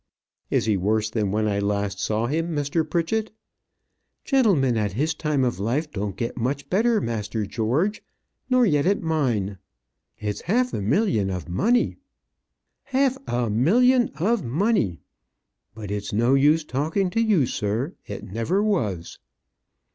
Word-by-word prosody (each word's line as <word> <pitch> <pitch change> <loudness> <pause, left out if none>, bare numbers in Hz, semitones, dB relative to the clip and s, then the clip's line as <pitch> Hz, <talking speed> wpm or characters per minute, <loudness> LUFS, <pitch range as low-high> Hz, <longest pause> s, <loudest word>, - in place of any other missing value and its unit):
"Is - - +1
he 105 -3 +2
worse 105 +3 0
than 105 -3 0
when 110 +1 +1
I 100 -1 0
last 100 -1 -1
saw 110 +2 0
him, 165 +5 -1
Mr. 145 +3 0
Pritchett?" 180 +7 -1 0.9
"Gentlemen 195 - +3
at 105 -3 -1
his 150 +8 0
time 150 -3 0
of 120 -5 -1
life 135 +9 -1
don't 100 -4 -3
get 115 - -3
much 130 +4 -2
better, 220 +4 +3
master 110 - -3
George 130 - -1 0.5
nor 255 -1 +4
yet 150 -5 +2
at 200 -1 +1
mine. 120 - 0 0.6
It's 105 -1 -4
half 250 +6 +1
a - - -2
million 110 - +1
of 90 -2 -4
money; 230 - +1 0.9
half 265 -1 +1
a 120 0 0
million 240 - +4
of 220 +5 +1
money! 125 - 0 0.7
But 105 -3 -7
it's 100 0 -3
no 120 +5 +2
use 150 +4 +4
talking 160 +7 -1
to 225 - +1
you, 205 - +3
sir 115 - -2
it 100 - -6
never 115 - -1
was." 105 - -1
135 Hz, 145 wpm, -24 LUFS, -, 0.9 s, nor